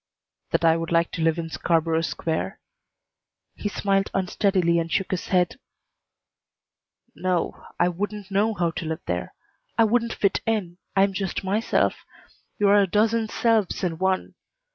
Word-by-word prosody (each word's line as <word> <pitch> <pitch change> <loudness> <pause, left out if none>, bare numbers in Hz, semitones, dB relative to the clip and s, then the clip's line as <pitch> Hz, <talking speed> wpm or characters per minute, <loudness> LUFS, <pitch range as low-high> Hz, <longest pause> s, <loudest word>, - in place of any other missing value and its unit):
"That - - +1
I 165 0 +5
would 165 0 -4
like 170 0 +2
to - - -4
live 165 0 +2
in 165 -1 -4
Scarborough 165 -1 +1
Square?" 165 -1 -2 0.9
He 205 - -4
smiled 195 -1 +1
unsteadily 185 -2 +2
and 165 0 -3
shook 195 +3 0
his 185 - -2
head. 180 -2 +1 1.5
"No, 185 -1 -2
I 175 - +4
wouldn't 200 +3 -4
know 210 +3 +2
how 175 -3 +1
to 165 - -5
live 160 +1 -3
there. - - -3 0.4
I 230 - +6
wouldn't 230 +1 +1
fit 200 -2 +1
in. 190 -6 -1 0.2
I 195 - +5
am 195 0 +1
just 190 0 -3
myself. 205 +4 +1 0.5
You 205 - +3
are 205 0 +6
a 195 - +2
dozen 220 +3 +2
selves 225 -6 +1
in 165 -3 -1
one. 190 0 0
190 Hz, 160 wpm, -24 LUFS, 170-205 Hz, 1.5 s, I